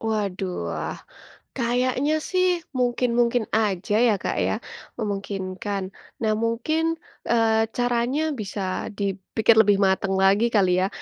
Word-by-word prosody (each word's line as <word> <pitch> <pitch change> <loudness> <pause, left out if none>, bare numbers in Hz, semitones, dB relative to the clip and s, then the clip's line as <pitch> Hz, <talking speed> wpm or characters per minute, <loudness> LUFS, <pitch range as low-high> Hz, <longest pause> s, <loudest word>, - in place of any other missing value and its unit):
Waduh, 200 -4 -2 0.2
ah, - - -4 0.6
kayaknya 255 +4 +1 0.2
sih 370 -1 +2 0.3
mungkin-mungkin 240 -1 +1
aja 205 -1 0
ya, 220 - +4
Kak, - - -1
ya, - - 0 0.5
memungkinkan 195 -1 -3 0.4
nah 215 - +2
mungkin, 240 +8 0 0.5
eee, 225 -1 +3
caranya 245 +4 +1 0.2
bisa 200 -1 -4 0.4
dipikir 200 +3 +1
lebih 205 -1 +4
matang 190 0 0
lagi 200 +4 +4
kali 190 -3 +4
ya 190 - +2
220 Hz, 115 wpm, -24 LUFS, 195-240 Hz, 0.6 s, ya